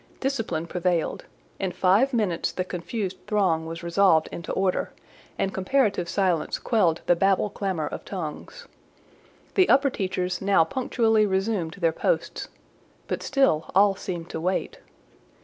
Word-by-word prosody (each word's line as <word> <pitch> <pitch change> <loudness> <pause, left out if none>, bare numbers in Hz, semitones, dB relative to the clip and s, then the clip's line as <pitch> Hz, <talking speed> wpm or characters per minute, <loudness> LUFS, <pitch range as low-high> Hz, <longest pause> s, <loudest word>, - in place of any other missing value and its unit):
Discipline 225 - -2
prevailed: 175 -1 -1 0.3
in 190 - -1
five 200 +9 +3
minutes 205 -9 0
the 185 - -2
confused 185 +2 -4
throng 180 -6 +1
was 165 +1 -7
resolved 170 -2 +3
into 170 - -6
order, 190 -1 0 0.5
and 195 - -1
comparative 195 -3 +1
silence 185 -5 0
quelled 180 -9 +1
the 175 - +4
Babel 195 +3 +2
clamour 190 -7 -2
of - - -6
tongues. 195 - -7 0.9
The 375 - +4
upper 275 0 +4
teachers 185 -3 -2
now 195 -3 +4
punctually 225 +1 +1
resumed 190 -4 -1
their 170 -4 +1
posts: - - -1 0.6
but - - -3
still, 270 - +1
all 200 +1 +6
seemed 175 -3 -6
to 160 - -4
wait. 185 +2 -2
190 Hz, 135 wpm, -25 LUFS, 170-210 Hz, 0.9 s, all